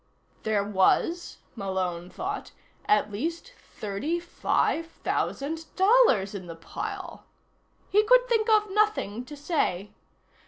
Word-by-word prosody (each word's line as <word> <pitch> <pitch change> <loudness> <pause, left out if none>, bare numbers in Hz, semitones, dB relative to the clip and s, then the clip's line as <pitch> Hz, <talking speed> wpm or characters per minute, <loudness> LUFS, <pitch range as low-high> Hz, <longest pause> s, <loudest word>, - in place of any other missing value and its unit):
There 215 -2 +1
was, 210 - +1 0.2
Malone 185 -4 -3
thought, 395 - -5 0.3
at 420 - +3
least 330 - -4
thirty 230 +12 -3
five 335 -1 0
thousand 320 0 -3
dollars 380 - +4
in 185 -3 -7
the 165 - -7
pile. 380 - -6 0.6
He 420 +2 +4
could - - +5
think 455 -2 +2
of 425 -2 +4
nothing 385 - +1
to 295 +3 -10
say. 280 - -1
325 Hz, 115 wpm, -27 LUFS, -, 0.6 s, could